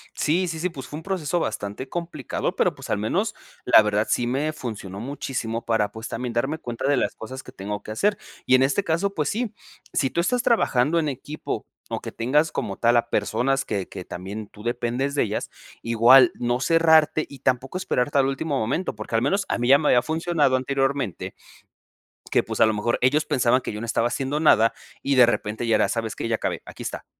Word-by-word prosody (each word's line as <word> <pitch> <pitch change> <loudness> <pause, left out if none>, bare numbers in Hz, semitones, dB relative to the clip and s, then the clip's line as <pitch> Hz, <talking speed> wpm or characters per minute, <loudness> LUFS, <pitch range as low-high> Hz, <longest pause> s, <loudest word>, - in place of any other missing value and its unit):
Sí, 175 +4 +1
sí, 160 -1 -4
sí, 180 +2 0
pues, 135 -6 -9
fue 150 - -7
un 160 - -9
proceso 175 -3 -1
bastante 110 -1 -4
complicado, 170 -1 -3
pero, - - +1
pues, - - -8
al - - +1
menos - - 0 0.3
la - - +8
verdad 105 0 +1
sí 120 - +1
me 145 +5 -1
funcionó 105 -8 -6
muchísimo 120 -3 -4
para, 110 -3 +1
pues, 110 +1 -7
también 120 0 -4
darme 135 +7 -1
cuenta 120 0 -4
de 145 -2 +3
las - - 0
cosas 130 +4 -8
que - - -13
tengo 105 +2 -5
que 110 - -8
hacer, 205 - +1 0.3
y - - +2
en 130 - +4
este 140 +9 +1
caso, 185 +4 0
pues 150 -2 0
sí. 230 0 -2 0.4
Si 135 -2 0
tú 170 - +1
estás 245 +6 0
trabajando 160 - +2
en 155 -2 0
equipo 145 +3 -5 0.2
o - - -2
que - - -7
tengas 150 +7 +1
como 95 - -3
tal 120 +1 +3
a 120 0 +2
personas 125 +6 0
que 100 -6 -3
que 90 - -8
también 100 +4 -7
tú 105 - -15
dependes 120 +4 -1
de - - +3
ellas, 105 -1 -3 0.3
igual 120 +3 +6
no 120 +1 -1
cerrarte 160 +1 +4
y 140 - -12
tampoco 130 +7 -1
esperarte 145 -6 0
al 135 - +3
último 140 +1 -2
momento, 130 +7 -1
porque 110 +1 -5
al 115 - +3
menos 195 +7 +1
a - - 0
mí 120 0 -1
ya 140 - +8
me 150 - 0
había 120 - +5
funcionado 160 -4 +1
anteriormente 135 -4 -1 0.9
que, - - +2
pues, - - -5
a - - +7
lo 110 - +1
mejor 110 +3 0
ellos 145 +5 +3
pensaban 130 -4 +2
que - - -5
yo 105 - -5
no - - -3
estaba 115 +1 +1
haciendo 135 +4 -2
nada, 115 -7 +5 0.3
y 140 - +1
de 125 -2 +8
repente 110 -1 -2
ya 115 - +3
era: - - +2
"¿Sabes 115 -1 -2
qué? - - -3
Ya 115 - +1
acabé, - - -3
aquí - - -9
está". - - -5
130 Hz, 220 wpm, -24 LUFS, 115-155 Hz, 0.9 s, la